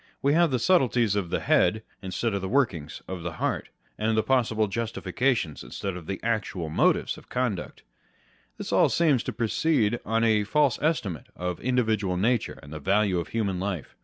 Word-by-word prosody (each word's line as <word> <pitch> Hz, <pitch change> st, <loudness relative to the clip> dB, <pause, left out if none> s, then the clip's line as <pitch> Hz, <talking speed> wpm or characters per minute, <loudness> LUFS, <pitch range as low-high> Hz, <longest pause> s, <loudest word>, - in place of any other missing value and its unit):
We 140 Hz, +1 st, +3 dB
have 170 Hz, +1 st, +4 dB
the 130 Hz, -, +1 dB
subtleties 125 Hz, -, +3 dB
of 100 Hz, -4 st, -1 dB
the -, -, -1 dB
head, 110 Hz, +1 st, +2 dB, 0.2 s
instead 100 Hz, +4 st, -2 dB
of 100 Hz, -, -1 dB
the 95 Hz, -, -3 dB
workings 95 Hz, -, 0 dB
of 95 Hz, -2 st, -5 dB
the 85 Hz, 0 st, -4 dB
heart, -, -, -2 dB, 0.3 s
and 110 Hz, +1 st, +1 dB
possible 115 Hz, -4 st, +2 dB
justifications 115 Hz, -, -1 dB
instead 95 Hz, -2 st, -5 dB
of 85 Hz, -3 st, -9 dB
the 95 Hz, -, -3 dB
actual 110 Hz, -7 st, -2 dB
motives 75 Hz, -, +1 dB
of -, -, -21 dB
conduct. 120 Hz, -8 st, -3 dB, 0.7 s
This -, -, -5 dB
all -, -, +5 dB
seems 150 Hz, -8 st, +3 dB
to -, -, -4 dB
proceed 120 Hz, -1 st, +1 dB
on 115 Hz, +1 st, 0 dB
a 110 Hz, -2 st, +3 dB
false 145 Hz, +3 st, +2 dB
estimate 125 Hz, -, -1 dB
of 90 Hz, 0 st, -3 dB
individual 110 Hz, -7 st, 0 dB
nature 115 Hz, +4 st, 0 dB
and 75 Hz, +2 st, -10 dB
the 75 Hz, -, -5 dB
value 95 Hz, +3 st, +2 dB
of 85 Hz, -, -4 dB
human 100 Hz, -5 st, -1 dB
life. 95 Hz, -5 st, -4 dB
110 Hz, 180 wpm, -26 LUFS, 95-125 Hz, 0.7 s, all